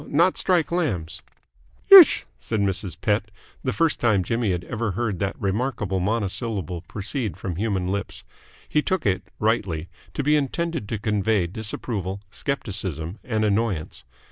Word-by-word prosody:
"Not 170 +5 +3
strike 175 -4 +1
lambs." 110 - -1 0.7
"Isch," 380 -5 +10
said 110 - -2
Mrs. 95 -2 -2
Pett 105 +1 0 0.3
the 130 - 0
first 165 +2 +1
time 110 -6 +3
Jimmy 115 +2 0
had 90 -1 -2
ever 110 0 -3
heard 105 -3 -2
that 100 0 -2
remarkable 100 -1 -1
monosyllable 100 - -1
proceed 105 - -3
from 95 -3 -4
human 95 -1 -1
lips. 100 +1 -3 0.4
He 150 - +2
took 185 0 -1
it 95 -3 +2 0.2
rightly 95 -7 0 0.3
to 145 - -1
be 150 +2 +4
intended 150 -3 -1
to 110 - -1
convey 105 -2 +1
disapproval, 100 0 -4
scepticism, 95 - -3
and 110 -3 0
annoyance. 100 - -1
105 Hz, 145 wpm, -24 LUFS, 95-120 Hz, 0.7 s, Isch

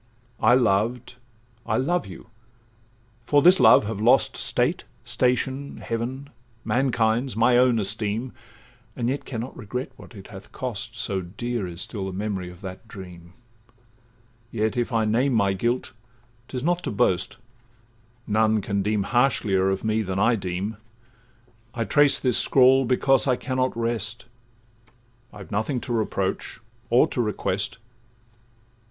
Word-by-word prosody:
'I 120 +3 +5
loved, 120 +2 +1 0.5
I 110 -1 -1
love 140 - 0
you, 95 +4 -12 1.0
for 145 -1 +4
this 180 +2 +6
love 110 -4 +7
have 105 -1 -4
lost 120 +3 +3
State, - - 0 0.2
station, 130 +2 -1
heaven, 130 +5 -5 0.3
mankind's, 120 -1 +1
my 115 +2 +4
own 125 -1 +4
esteem, 105 +4 -2 0.6
And 120 -1 -1
yet 140 +2 -3
can 120 -4 -4
not 125 - -7
regret 125 +3 -5
what - - -14
it 95 -2 -11
hath 95 -1 -12
cost, 120 -2 -5
So 100 -4 -2
dear 105 +4 -4
is 85 0 -5
still 95 -1 -4
the 95 - -5
memory 95 -2 -3
of 90 +1 -14
that 95 +3 -9
dream; 90 -5 -11 1.2
Yet, 110 -1 -1
if 120 +1 -1
I 115 -2 +1
name 125 +5 +1
my 100 -3 +2
guilt, 120 +6 -2 0.5
'tis 125 -1 -5
not 175 +2 +1
to - - -2
boast, 100 +1 0 0.9
None 110 0 +2
can 100 +1 -1
deem 105 0 0
harshlier 100 -5 +2
of 95 0 -2
me 110 0 +1
than 95 -2 -3
I 115 +4 +3
deem: 95 +2 -4 1.0
I 115 - -1
trace 145 +6 +4
this 125 -3 +3
scrawl 130 0 +5
because 135 +2 +2
I 130 - +3
cannot 130 -1 -2
rest— 115 -1 -2 1.1
I've 100 -1 -12
nothing 110 +6 -1
to 120 - -4
reproach, 100 -3 -2 0.3
or 120 +2 +5
to 125 - -1
request. 105 -1 -2
115 Hz, 145 wpm, -24 LUFS, 100-125 Hz, 1.2 s, love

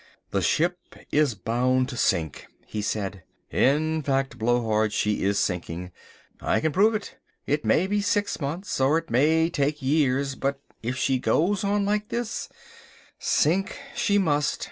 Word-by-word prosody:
"The - - +1
ship 175 +3 +1 0.3
is 145 -6 +2
bound 125 +6 +1
to 130 - -6
sink," 85 - 0 0.2
he 105 - -4
said, 100 -2 -3 0.3
"in 155 +4 +2
fact, 135 -1 -1
Blowhard, 110 -2 +1
she 105 0 0
is 100 +1 +1
sinking. 90 -1 -2 0.5
I - - +1
can 155 - 0
prove 210 +7 +4
it. 210 - -6 0.3
It 145 +1 0
may 180 - +3
be 205 +1 0
six 205 -1 0
months 160 +3 -3
or 140 +4 +4
it 165 -1 -5
may 160 +6 +4
take 145 -1 0
years, 135 -1 +1
but 135 +1 -2 0.2
if 125 +3 -3
she 130 0 +1
goes 190 +9 +1
on 200 0 +1
like 210 +1 0
this, 235 -1 -3 0.7
sink 185 +6 +1 0.2
she 230 -4 +2
must. 150 -6 +1
140 Hz, 155 wpm, -25 LUFS, 120-175 Hz, 0.7 s, prove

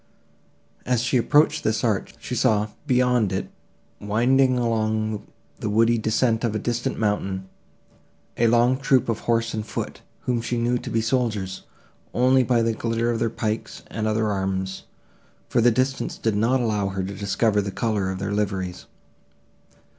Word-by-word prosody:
As 125 -2 +1
she 125 +1 +2
approached 145 +5 +3
this 110 -1 0
arch, 110 -5 -1
she - - -6
saw, 110 -4 +2 0.2
beyond 125 - +3
it, 95 0 -3 0.5
winding 125 +5 +3
along 110 -2 -1 0.3
the 105 - -2
woody 115 +2 +3
descent 110 +1 +1
of 115 -2 0
a - - +2
distant 120 +2 -2
mountain, 95 -3 -1 0.9
a 120 - +3
long 120 +3 +3
troop 135 -3 +2
of 115 - 0
horse 115 0 0
and 110 - -2
foot, 110 - -5 0.2
whom 120 -2 -1
she 120 +1 -2
knew 120 +1 +1
to - - -7
be 115 - +1
soldiers, 110 -5 -1 0.5
only 130 +3 +4
by 120 -2 +2
the 115 0 +1
glitter 115 +1 -1
of 115 - -1
their 115 0 +1
pikes 110 -1 -4
and 110 -1 -2
other 110 0 +1
arms, 95 -1 -2 0.6
for 120 - +2
the 120 - +6
distance 130 +3 -1
did 110 -2 0
not 115 +5 +2
allow 105 -4 0
her 95 -1 -3
to 95 +2 -4
discover 105 +1 +1
the 100 - -4
colour 105 -2 -1
of 95 - -3
their 100 +2 -3
liveries. 95 -3 -2
115 Hz, 165 wpm, -24 LUFS, 105-120 Hz, 0.9 s, the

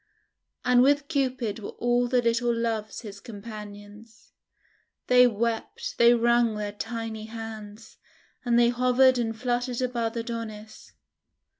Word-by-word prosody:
And 250 0 +5
with 285 +2 +3
Cupid 255 -7 -1
were 205 - -8
all 245 0 +1
the 250 0 +1
little 235 +1 +1
Loves 230 -2 -2
his 205 -3 -9
companions. 210 0 -11 0.7
They 250 0 +6
wept, 230 0 -3
they 235 +1 +7
wrung 235 -1 +2
their 210 -1 -3
tiny 225 0 -5
hands, 220 -1 -9 0.5
and 240 -2 +2
they 240 0 +5
hovered 255 +1 +3
and 225 -1 -2
fluttered 245 0 -1
above 240 -3 -2
Adonis. 225 -2 -7
230 Hz, 125 wpm, -26 LUFS, 220-245 Hz, 0.7 s, they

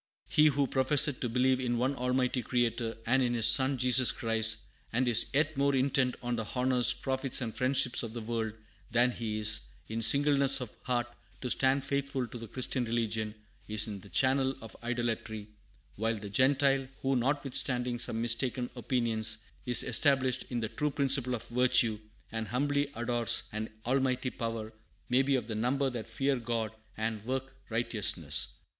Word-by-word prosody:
"He 155 0 +4
who 140 -1 +2
professeth 135 +2 +2
to 120 - -2
believe 130 +2 +2
in 120 -2 -1
one 130 +4 0
Almighty 125 0 0
Creator, 120 -1 -1
and 130 +3 +2
in 120 -1 0
His 115 -2 +2
Son 135 +2 +6
Jesus 125 -1 +4
Christ, 110 -1 +1 0.3
and 125 +2 0
is 115 -1 +7
yet 150 +3 +1
more 140 0 +1
intent 130 -1 +1
on 120 0 -2
the 110 - -3
honors, 125 -1 +3
profits, 130 -1 0
and 115 -4 -4
friendships 130 -1 +2
of 115 -2 -6
the 120 - -5
world 110 -1 -3 0.4
than 120 +1 +3
he 110 -3 -4
is, 105 0 +3 0.3
in 115 +1 -3
singleness 140 +2 +4
of 125 -5 -6
heart, 120 -2 0 0.4
to 125 - 0
stand 135 +1 +2
faithful 140 -2 -2
to 120 0 -9
the 115 - -8
Christian 130 +3 -3
religion, 110 -2 -2 0.3
is 105 0 0
in 105 -3 -6
the 100 - -15
channel 135 +2 +2
of 110 -3 -11
idolatry; 115 -3 -3 0.5
while 115 +2 0
the 100 -1 -8
Gentile, 135 +3 +2 0.2
who, 135 0 +1
notwithstanding 125 -2 0
some 115 -1 -1
mistaken 120 +2 0
opinions, 110 -2 +1 0.2
is 120 -2 +4
established 130 0 +2
in 120 -2 -3
the 110 - -2
true 150 - -2
principle 135 -3 +1
of 115 - -8
virtue, 120 -3 +2 0.3
and 110 -1 -4
humbly 140 +5 0
adores 120 -1 +1
an 110 +1 -4 0.2
Almighty 130 0 0
Power, 115 -1 -5 0.4
may 125 +2 +4
be 135 0 +1
of 125 -4 -1
the 115 - -4
number 130 +5 0
that 120 -3 -6
fear 135 +4 0
God 115 -2 -3 0.3
and 110 -1 -3
work 130 +2 -4
righteousness." 100 -10 -1
125 Hz, 170 wpm, -30 LUFS, 115-130 Hz, 0.5 s, is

